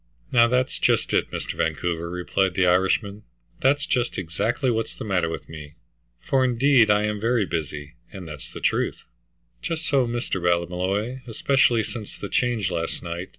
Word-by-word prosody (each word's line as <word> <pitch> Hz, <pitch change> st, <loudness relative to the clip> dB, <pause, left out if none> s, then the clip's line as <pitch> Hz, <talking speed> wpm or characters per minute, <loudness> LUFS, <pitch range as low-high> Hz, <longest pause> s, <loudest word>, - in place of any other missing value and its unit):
"Now, 115 Hz, -1 st, +6 dB
that's 125 Hz, +2 st, 0 dB
just -, -, +2 dB
it, -, -, +2 dB
Mr. -, -, -4 dB
Vancouver," 85 Hz, -1 st, -2 dB
replied 90 Hz, +1 st, 0 dB
the 95 Hz, -, +3 dB
Irishman. 95 Hz, +3 st, +2 dB, 0.4 s
"That's 140 Hz, +2 st, +3 dB
just 125 Hz, -2 st, 0 dB
exactly 110 Hz, -, -1 dB
what's 115 Hz, -1 st, -2 dB
the -, -, -7 dB
matter 90 Hz, -5 st, +1 dB
with 80 Hz, -, -6 dB
me, 75 Hz, -2 st, -10 dB, 0.4 s
for 135 Hz, -1 st, +1 dB
indeed 125 Hz, -2 st, +4 dB
I 105 Hz, 0 st, +4 dB
am 105 Hz, -1 st, -2 dB
very 115 Hz, -2 st, +2 dB
busy, 75 Hz, -4 st, -4 dB, 0.2 s
and 95 Hz, -3 st, -8 dB
that's 75 Hz, -3 st, -8 dB
the -, -, -9 dB
truth." -, -, 0 dB, 0.6 s
"Just 165 Hz, 0 st, -3 dB
so, 135 Hz, -4 st, +2 dB
Mr. 115 Hz, -5 st, -2 dB
Ballymolloy. 90 Hz, +8 st, 0 dB
Especially 120 Hz, -1 st, +2 dB
since 110 Hz, -1 st, -7 dB
the 100 Hz, -, -6 dB
change 115 Hz, -7 st, 0 dB
last 85 Hz, -1 st, -3 dB
night. 85 Hz, +1 st, -5 dB
105 Hz, 165 wpm, -24 LUFS, 90-120 Hz, 0.6 s, Now